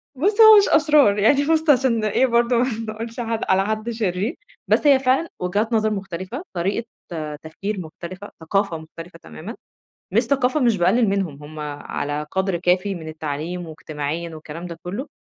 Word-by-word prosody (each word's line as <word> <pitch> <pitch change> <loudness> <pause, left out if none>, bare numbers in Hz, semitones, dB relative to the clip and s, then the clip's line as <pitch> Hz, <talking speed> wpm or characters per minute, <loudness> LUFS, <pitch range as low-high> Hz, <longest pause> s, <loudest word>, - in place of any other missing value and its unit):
بص 405 - +2
هو 435 -1 +10
مش 405 - +4
أشرار 295 -9 +4
يعني 275 +8 +4
بص 320 -1 +2
عشان 255 -5 +3
إيه 215 +5 +2
برضه 235 0 +2
ما 245 - +3 0.3
نقولش 230 +2 -7
ح 240 - -1 0.3
على 190 +1 +3
حد 215 +2 -2
شرير 215 - -2 0.3
بس 295 - +3
هي 275 -2 +6
فعلًا 265 +5 +1
وجهات 205 +6 -1
نظر 215 -1 +2
مختلفة، 195 - -5
طريقة 195 +6 -1 0.6
تفكير 195 +6 -5
مختلفة، 180 +4 -9
ثقافة 195 +1 0
مختلفة 165 +2 -11
تمامًا، 80 -1 -9 0.6
مش 225 +4 +4
ثقافة 260 +3 +1
مش 235 -4 +3
باقلل 205 +6 +3
منهم؛ 180 -8 -2
همّ 155 +1 -10
على 145 0 -4
قدر 190 -1 0
كافي 185 +3 +1
من 160 -2 -7
التعليم 155 +3 -5
واجتماعيًا 155 +1 -5
والكلام 155 +2 -8
ده 170 -2 -8
كله، 200 +11 -5
200 Hz, 165 wpm, -22 LUFS, 170-240 Hz, 0.6 s, هو